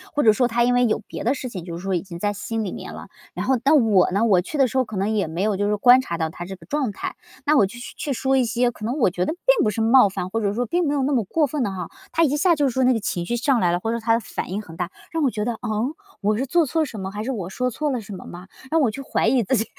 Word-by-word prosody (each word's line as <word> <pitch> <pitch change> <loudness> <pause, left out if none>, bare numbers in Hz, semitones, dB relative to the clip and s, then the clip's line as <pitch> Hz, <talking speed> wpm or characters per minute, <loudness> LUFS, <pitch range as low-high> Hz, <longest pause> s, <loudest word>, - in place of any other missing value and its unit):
或 295 - +2
者 220 - +6
说 245 +3 +2
他 240 0 +1
因 245 +1 +3
为 245 0 +4
有 215 - +1
别 - - -7
的 250 +5 +1
事 260 - -5
情 190 -8 -7
就 170 -1 -6
是 175 - -9
说 195 0 -1
已 175 - +1
经 180 -3 -9
在 205 +3 -1
心 225 +2 -3
里 195 - -4
面 - - -7
了， - - -9 0.3
然 - - -3
后 265 -1 +3
但 285 -2 +5
我 200 -4 +4
呢 200 +5 +1
我 195 -5 +4
去 250 - -6
的 270 -2 +4
时 260 +2 0
候 - - +3
可 220 -4 -7
能 200 +3 0
也 210 -5 0
没 165 +4 -3
有 210 -1 +1
就 205 - 0
是 - - +1
说 210 - +1
观 245 +4 +7
察 170 -10 -4
到 160 -1 -1
他 175 - -7
这 190 +2 -7
个 185 - -17
状 285 -6 -1
态。 195 - -5 0.3
那 305 +1 +4
我 205 -9 +5
就 225 +5 -11
去 240 - -8
去 285 - -3
说 265 +2 +1
一 260 -2 +3
些， 240 +1 +1
可 215 - -13
能 240 +6 -2
我 225 - +3
觉 180 0 -1
得 - - -1
并 - - +2
不 215 - +2
是 210 - -3
冒 230 -1 +6
犯， 185 -1 -5
或 225 - -1
者 200 -1 0
说 245 +2 0
并 345 +6 0
没 290 - 0
有 275 - +1
那 285 +2 +1
么 235 -5 +2
过 305 - +1
分 290 0 -3
的 220 - 0
哈， 180 -3 -5 0.2
他 330 - +2
一 290 -2 +2
下 340 +3 +3
就 290 -2 +1
是 - - 0
说 260 - +1
那 255 0 +4
个 225 - 0
情 175 -4 -3
绪 240 - 0
上 250 +1 +2
来 175 -4 +2
了， 175 - 0
或 225 +5 -2
者 235 - -1
他 225 0 +2
的 - - +1
反 215 - -6
应 195 - -2
很 165 -5 -12
大， 175 +1 -3 0.2
让 330 - -1
我 270 - +3
觉 210 -3 -3
得， 240 - -1
啊？ 230 +1 -6 0.5
我 210 +1 +2
是 265 - -2
做 335 +4 +3
错 320 +4 0
了 - - +2
什 220 - -8
么 190 0 -4
还 210 +1 -5
是 265 - -2
我 190 -8 -4
说 250 +5 -1
错 295 +5 -2
了 250 -3 -2
什 210 -1 -9
么 185 - -9
吗？ 180 +2 -10 0.2
让 325 0 +3
我 260 - +3
去 225 +6 -7
怀 - - 0
疑 255 -3 +3
自 260 - +1
己， 225 -1 +1
230 Hz, 380 characters per minute, -23 LUFS, 195-265 Hz, 0.5 s, 观